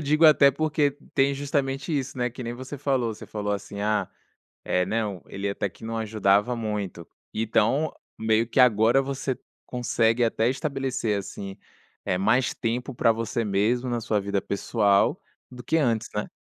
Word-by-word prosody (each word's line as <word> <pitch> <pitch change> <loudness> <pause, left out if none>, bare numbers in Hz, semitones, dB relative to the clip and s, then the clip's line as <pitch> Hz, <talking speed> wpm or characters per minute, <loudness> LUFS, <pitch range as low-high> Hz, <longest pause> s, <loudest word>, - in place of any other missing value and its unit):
digo 150 +2 +2
até 145 -3 +8
porque 150 0 +1 0.2
tem 140 0 +3
justamente 140 +2 -1
isso, 135 -1 -3
né, 125 -1 0
que 125 +1 -8
nem 120 0 -4
você 130 +3 -7
falou, 130 -5 0
você 110 - -11
falou 105 0 -3
assim: 100 0 -5
"Ah, 105 0 0 0.6
eh, 90 0 +1
não, 105 -2 -2
ele 100 +1 -3
até 100 0 -2
que 100 - -18
não 115 0 -3
ajudava 110 +1 +2
muito", 105 -6 -4 0.3
então 115 +7 +1 0.3
meio 110 +1 +2
que 130 - -1
agora 120 +2 +5
você 135 -1 -3 0.3
consegue 120 -1 +1
até 115 +1 +2
estabelecer, 135 -6 -1
assim, 100 0 -7 0.5
eh, 90 - +1
mais 110 +7 +2
tempo 125 +3 -3
pra 115 -1 +3
você 115 0 -2
mesmo 110 +6 +1
na 120 -1 -1
sua 110 -2 0
vida 100 -1 -1
pessoal, 100 0 +2 0.3
do 125 -1 -10
que 160 - +1
antes, 115 -6 +1
né. 105 - -2
115 Hz, 170 wpm, -26 LUFS, 105-135 Hz, 0.6 s, até